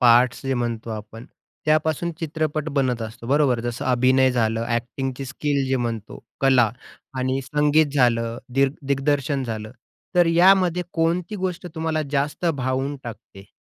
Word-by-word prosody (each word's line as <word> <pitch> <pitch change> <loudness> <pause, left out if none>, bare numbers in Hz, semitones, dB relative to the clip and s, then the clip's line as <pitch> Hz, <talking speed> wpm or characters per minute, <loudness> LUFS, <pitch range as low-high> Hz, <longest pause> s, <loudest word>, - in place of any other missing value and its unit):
Parts 125 +1 +5
जे 135 - +1
म्हणतो 115 -2 -3
आपण 110 +3 -8 0.4
त्यापासून 155 +2 +1
चित्रपट 155 -1 -2
बनत 125 -4 +1
असतो, 115 +1 -8
बरोबर? 135 -3 +2
जसं 120 +1 -4
अभिनय 130 +1 +4
झालं 115 -2 0
एक्टिंगची 130 +2 -4
स्किल 140 +1 -1
जे 130 - +2
म्हणतो, 115 -3 -4 0.2
कला 130 -5 +4 0.5
आणि 130 +1 0
संगीत 150 +3 +3
झालं, 115 -3 +2
दिर 135 +1 +3
दिग्दर्शन 140 0 0
झालं, 110 -2 -5 0.4
तर 175 -1 +5
यामध्ये 180 +1 +4
कोणती 170 +5 0
गोष्ट 185 -2 -3
तुम्हाला 160 -1 -1
जास्त 145 +5 0
भावून 130 +2 -1
टाकते? 100 -4 -10
135 Hz, 135 wpm, -23 LUFS, 120-155 Hz, 0.5 s, Parts